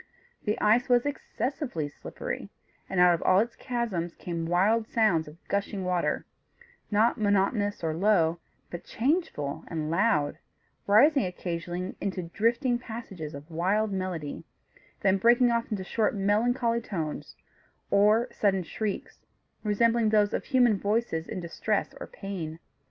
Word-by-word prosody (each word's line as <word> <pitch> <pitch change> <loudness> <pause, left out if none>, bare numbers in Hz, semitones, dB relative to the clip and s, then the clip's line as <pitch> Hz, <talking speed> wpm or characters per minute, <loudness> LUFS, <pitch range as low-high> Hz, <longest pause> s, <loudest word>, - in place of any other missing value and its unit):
The 210 0 0
ice 235 +4 +3
was 245 0 +4
excessively 270 - -3
slippery, 145 - -6 0.4
and 190 - -1
out 180 0 +7
of 170 - -2
all 185 - +4
its 230 +3 -1
chasms 225 -9 -3
came 170 -2 -4
wild 210 +6 +2
sounds 200 -11 +2
of 150 +2 -12
gushing 200 -1 -2
water; 180 -1 0 0.6
not 220 +3 +2
monotonous 205 -1 +1
or 160 -1 0
low; 170 -3 +3 0.3
but 175 - -6
changeful 260 - -1
and 155 -2 -3
loud, 160 -5 +1 0.5
rising 275 +8 +5
occasionally 175 +1 -4
into 190 -2 -2
drifting 235 - +1
passages 195 - -7
of 145 +4 -11
wild 200 +6 +1
melody, 185 -6 -4 0.6
then 195 -2 +3
breaking 240 +3 +5
off 235 0 0
into 200 -3 -3
short 215 +3 0
melancholy 230 +4 +1
tones, 165 -9 -5 0.6
or 210 +4 +4
sudden 195 -3 +1
shrieks, 205 +4 -5 0.4
resembling 230 +1 +2
those 210 -1 +3
of - - -2
human 245 -7 +3
voices 205 -6 -1
in 205 - -4
distress 180 +4 -2
or - - -7
pain. 175 -5 -6
200 Hz, 135 wpm, -28 LUFS, 175-230 Hz, 0.6 s, out